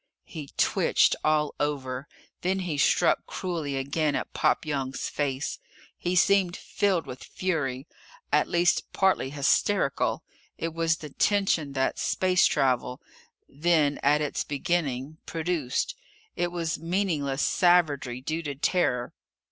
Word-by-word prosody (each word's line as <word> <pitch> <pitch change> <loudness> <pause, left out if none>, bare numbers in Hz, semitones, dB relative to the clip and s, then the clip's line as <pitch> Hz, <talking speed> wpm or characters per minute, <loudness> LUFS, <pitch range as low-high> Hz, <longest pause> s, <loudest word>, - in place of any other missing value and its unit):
He 150 -5 -8
twitched - - +3
all 155 -1 +2
over. 135 -2 -2 0.3
Then 190 +2 0
he 165 -6 -3
struck - - +3
cruelly 160 -7 -3
again 145 +2 0
at - - -4
Pop - - +1
Young's 135 -3 -3
face. 140 -1 -2 0.4
He 180 +1 -2
seemed 185 -1 +3
filled 190 -5 0
with 125 - -8
fury, 145 -8 -2 0.5
at - - +4
least 175 0 +1
partly 190 -8 +2
hysterical. 145 +3 +1 0.3
It 165 -1 -3
was 165 -1 +1
the 150 -3 -9
tension 185 -6 +1
that 130 -1 0
space 185 -1 +3
travel 125 -1 0 0.5
then, 150 -1 +1
at 150 +2 +3
its 150 - -1
beginning 145 -2 -2
produced. 165 - -1 0.4
It 175 0 -1
was 165 -3 -2
meaningless 165 -6 -1
savagery 150 -9 +2
due 155 +5 -2
to 145 -3 -5
terror. 130 -5 0
155 Hz, 125 wpm, -27 LUFS, 140-175 Hz, 0.5 s, at